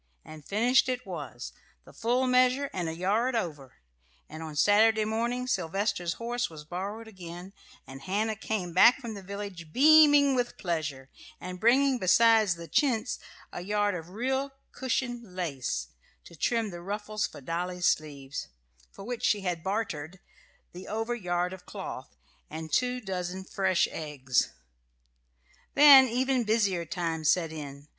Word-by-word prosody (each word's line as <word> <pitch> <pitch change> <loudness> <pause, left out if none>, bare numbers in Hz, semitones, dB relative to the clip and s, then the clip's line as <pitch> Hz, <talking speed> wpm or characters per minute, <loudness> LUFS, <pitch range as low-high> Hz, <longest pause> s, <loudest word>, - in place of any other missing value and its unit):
And 155 -1 -11
finished 245 - +2
it 255 -1 -3
was 145 -10 -7 0.3
the - - -15
full 245 +3 0
measure 255 +2 +3
and 175 -3 -2
a 160 - -5
yard 215 +8 0
over; 150 - -4 0.5
and 155 +1 -9
on 155 -2 -7
Saturday 215 +6 +4
morning 235 +3 -1
Sylvester's 195 -3 -1
horse 240 +3 -3
was 155 -2 -11
borrowed 200 +7 -5
again, 180 -2 -10 0.3
and 135 +1 -11
Hannah 210 +7 -1
came 200 -5 -3
back 235 +7 +7
from 235 -4 -6
the 200 - -8
village 195 -4 -7
beaming 290 - +6
with 245 -2 -1
pleasure, 150 -7 -4 0.3
and 180 0 -7
bringing 260 +4 +3
besides 220 0 +4
the 170 0 -9
chintz 245 - 0 0.3
a - - -5
yard 205 +2 0
of 170 -1 -6
real 265 +7 -1 0.2
cushion 245 -5 -3
lace, 130 - -3 0.3
to - - -14
trim 225 +5 0
the 175 -1 -8
ruffles 210 +3 -3
for - - -12
Dolly's 175 +5 -3
sleeves, 145 -3 -1 0.4
for - - -11
which 245 0 -5
she 205 - +2
had 175 -3 -3
bartered 190 -4 -3 0.5
the 180 +1 -10
over 225 +3 -2
yard 180 -4 -2
of 185 -1 -12
cloth - - -8 0.3
and 160 0 -7
two 250 0 +1
dozen 185 -2 -4
fresh 190 -1 +1
eggs. 140 -5 -1 1.2
Then 280 -3 +9
even 255 +1 +1
busier 200 -6 +1
times 165 -3 -2
set 165 -3 +2
in. 145 -2 -8
195 Hz, 150 wpm, -28 LUFS, 170-235 Hz, 1.2 s, Then